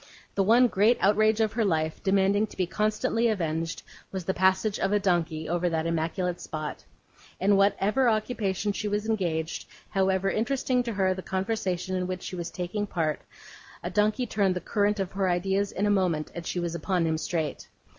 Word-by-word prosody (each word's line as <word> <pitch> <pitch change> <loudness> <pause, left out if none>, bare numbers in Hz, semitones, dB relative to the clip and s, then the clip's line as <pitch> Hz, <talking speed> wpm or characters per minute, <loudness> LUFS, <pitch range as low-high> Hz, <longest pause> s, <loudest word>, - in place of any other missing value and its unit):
The 200 - +1
one 230 +6 +5
great 220 +3 +3
outrage 215 +2 +3
of 220 -1 +1
her 225 0 +1
life, 160 -5 0
demanding 200 +2 +2
to - - -15
be 185 - +1
constantly 215 +4 0
avenged, 165 -5 -2 0.3
was 190 -3 -4
the 190 - 0
passage 190 +3 +2
of 195 - 0
a 210 - +3
donkey 170 -5 0
over 175 +1 0
that 160 -1 -1
immaculate 165 +2 -1
spot. 155 -1 -5 0.6
In 200 +2 +4
whatever 205 +5 +3
occupation 215 -3 0
she 210 +1 -3
was 210 +1 -1
engaged, 170 -7 -1 0.2
however 190 0 +1
interesting 250 +2 0
to 235 -2 -3
her 190 -2 +2
the 185 - -6
conversation 190 -2 -2
in 180 -1 -1
which 185 0 -4
she - - -5
was 170 -1 -4
taking 185 +4 -3
part, 160 -5 -1 0.6
a 175 - -3
donkey 215 +6 +2
turned 200 -4 +1
the - - -1
current 205 +2 0
of 190 -2 -2
her 195 -1 0
ideas 190 +3 0
in 200 - -1
a 205 - +3
moment, 180 -6 +1
and 170 -1 -6
she 180 - -2
was 170 -1 -2
upon 175 0 0
him 160 -1 0
straight. 160 -1 -3
190 Hz, 190 wpm, -27 LUFS, 175-210 Hz, 0.6 s, one